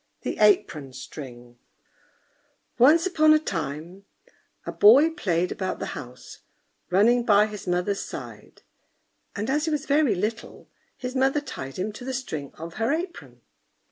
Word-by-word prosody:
THE -, -, -4 dB
APRON 165 Hz, -10 st, +2 dB
STRING 125 Hz, -3 st, -10 dB, 1.2 s
Once 305 Hz, +8 st, +6 dB
upon 310 Hz, -4 st, +4 dB
a -, -, +3 dB
time 170 Hz, -, -5 dB, 0.6 s
a -, -, -4 dB
boy 270 Hz, +10 st, +6 dB
played 180 Hz, -, -1 dB
about 190 Hz, -2 st, -3 dB
the -, -, -5 dB
house, 125 Hz, -2 st, -10 dB, 0.5 s
running 225 Hz, +7 st, +4 dB
by 210 Hz, -2 st, +5 dB
his 210 Hz, -2 st, -8 dB
mother's 180 Hz, +3 st, 0 dB
side; -, -, -10 dB, 0.7 s
and 210 Hz, +1 st, -3 dB
as 295 Hz, +3 st, 0 dB
he -, -, -1 dB
was 300 Hz, -1 st, -2 dB
very 285 Hz, -7 st, +2 dB
little, 215 Hz, +5 st, -5 dB, 0.3 s
his 255 Hz, 0 st, -6 dB
mother 270 Hz, +2 st, +2 dB
tied 135 Hz, -, -8 dB
him 195 Hz, +4 st, -2 dB
to 230 Hz, -, -10 dB
the 260 Hz, +1 st, -4 dB
string 155 Hz, -, -5 dB
of 165 Hz, +3 st, -9 dB
her 225 Hz, -, +1 dB
apron. 340 Hz, +3 st, -5 dB
210 Hz, 145 wpm, -25 LUFS, 170-270 Hz, 1.2 s, Once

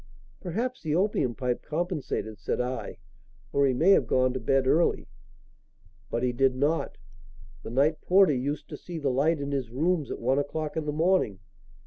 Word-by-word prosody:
"Perhaps 235 Hz, +8 st, -3 dB
the 155 Hz, -1 st, -1 dB
opium 175 Hz, -, +1 dB
pipe 125 Hz, -2 st, -2 dB
compensated," 155 Hz, -, -3 dB
said 100 Hz, -, -2 dB
I; 125 Hz, +1 st, -3 dB, 0.6 s
"or 140 Hz, 0 st, +3 dB
he 130 Hz, -, +2 dB
may 170 Hz, +9 st, +4 dB
have -, -, +4 dB
gone 130 Hz, 0 st, +2 dB
to 130 Hz, -, -3 dB
bed 135 Hz, +3 st, +1 dB
early." 160 Hz, +6 st, +2 dB, 1.0 s
"But 120 Hz, -, -2 dB
he 125 Hz, -, +2 dB
did 130 Hz, +1 st, +2 dB
not. 145 Hz, +5 st, 0 dB, 0.6 s
The -, -, -8 dB
night 140 Hz, +6 st, +1 dB
porter 185 Hz, -3 st, +5 dB
used 140 Hz, +3 st, -3 dB
to -, -, -7 dB
see 175 Hz, -2 st, -8 dB
the 145 Hz, -4 st, 0 dB
light 150 Hz, +5 st, +2 dB
in 140 Hz, 0 st, -4 dB
his 135 Hz, -4 st, -2 dB
rooms 155 Hz, +3 st, 0 dB
at -, -, -4 dB
one 130 Hz, +4 st, +1 dB
o'clock 150 Hz, +1 st, -3 dB
in 160 Hz, -, -2 dB
the -, -, +1 dB
morning. 160 Hz, -, +1 dB
145 Hz, 180 wpm, -27 LUFS, 130-165 Hz, 1.0 s, porter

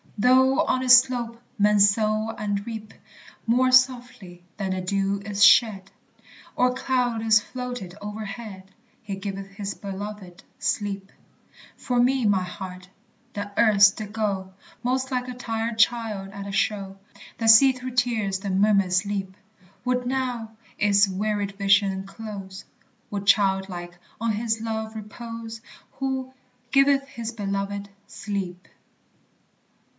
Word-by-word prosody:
Though 260 Hz, +4 st, +4 dB
on 255 Hz, 0 st, 0 dB
its 250 Hz, -1 st, +9 dB
slope 240 Hz, -2 st, -1 dB, 0.2 s
men 210 Hz, 0 st, +4 dB
sow 215 Hz, +2 st, +3 dB
and 205 Hz, -1 st, -2 dB
reap; 220 Hz, -2 st, -7 dB, 0.5 s
More 255 Hz, +3 st, +3 dB
softly 245 Hz, -8 st, +1 dB
than 195 Hz, -2 st, -2 dB
the 185 Hz, 0 st, -2 dB
dew 195 Hz, +1 st, -1 dB
is 205 Hz, 0 st, +1 dB
shed, 205 Hz, -6 st, +5 dB, 0.7 s
Or 250 Hz, 0 st, +2 dB
cloud 250 Hz, -3 st, -1 dB
is 220 Hz, -1 st, +5 dB
floated 245 Hz, -5 st, -7 dB
overhead, 205 Hz, -2 st, -7 dB, 0.3 s
"He 205 Hz, -4 st, -5 dB
giveth 195 Hz, 0 st, -6 dB
his 200 Hz, 0 st, -5 dB
beloved 195 Hz, -2 st, -8 dB, 0.2 s
sleep." 200 Hz, -1 st, -2 dB, 0.6 s
For 245 Hz, -2 st, -1 dB
me, 255 Hz, 0 st, +2 dB
my 200 Hz, -3 st, +3 dB
heart, 180 Hz, 0 st, -8 dB, 0.4 s
that 205 Hz, 0 st, -5 dB
erst 205 Hz, -3 st, +6 dB
did 210 Hz, -1 st, -7 dB
go 195 Hz, -4 st, -2 dB, 0.3 s
Most 260 Hz, +1 st, 0 dB
like 250 Hz, -1 st, -1 dB
a 250 Hz, -, -5 dB
tired 225 Hz, -2 st, -3 dB
child 220 Hz, -4 st, +1 dB
at 200 Hz, 0 st, -8 dB
a -, -, -5 dB
show. 195 Hz, -1 st, -1 dB, 0.4 s
That 225 Hz, -1 st, +2 dB
sees 255 Hz, +3 st, +7 dB
through 255 Hz, 0 st, -6 dB
tears 220 Hz, -6 st, 0 dB
the 195 Hz, 0 st, -4 dB
mummers 195 Hz, -1 st, +3 dB
leap, 195 Hz, -2 st, -4 dB, 0.5 s
Would 250 Hz, 0 st, 0 dB
now 250 Hz, -3 st, -2 dB, 0.3 s
its 205 Hz, -1 st, +4 dB
wearied 205 Hz, +1 st, -2 dB
vision 195 Hz, -1 st, +2 dB
close, 195 Hz, -2 st, -8 dB, 0.4 s
Would 200 Hz, -1 st, -4 dB
childlike 190 Hz, -3 st, +1 dB, 0.2 s
on 230 Hz, 0 st, 0 dB
his 225 Hz, +1 st, -1 dB
love 220 Hz, -1 st, -4 dB
repose 225 Hz, +1 st, -8 dB, 0.3 s
Who 265 Hz, -1 st, -3 dB, 0.4 s
"giveth 275 Hz, 0 st, +4 dB
his 235 Hz, -5 st, -6 dB
beloved 200 Hz, -1 st, -3 dB, 0.2 s
sleep." 185 Hz, -3 st, -5 dB
210 Hz, 130 wpm, -24 LUFS, 195-240 Hz, 0.7 s, its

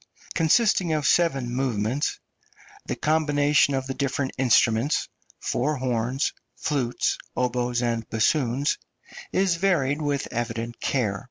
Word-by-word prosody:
consisting 180 Hz, +1 st, +3 dB
of 150 Hz, -2 st, -1 dB
seven 135 Hz, -8 st, +2 dB
movements, 125 Hz, +1 st, -1 dB, 0.7 s
the -, -, -2 dB
combination 145 Hz, -2 st, +2 dB
of 135 Hz, 0 st, -2 dB
the 135 Hz, -, -3 dB
different 140 Hz, 0 st, -1 dB
instruments 120 Hz, +1 st, +3 dB, 0.3 s
(four 150 Hz, +5 st, -1 dB
horns, 125 Hz, +1 st, -1 dB, 0.2 s
flutes, 130 Hz, -5 st, -1 dB, 0.2 s
oboes, 125 Hz, -1 st, 0 dB
and 115 Hz, -2 st, -2 dB
bassoons) 125 Hz, +4 st, +1 dB, 0.5 s
is 185 Hz, -3 st, +2 dB
varied 155 Hz, -6 st, +1 dB
with 145 Hz, -2 st, -1 dB
evident 115 Hz, 0 st, -3 dB
care. 105 Hz, -7 st, 0 dB
135 Hz, 110 wpm, -25 LUFS, 120-150 Hz, 0.7 s, consisting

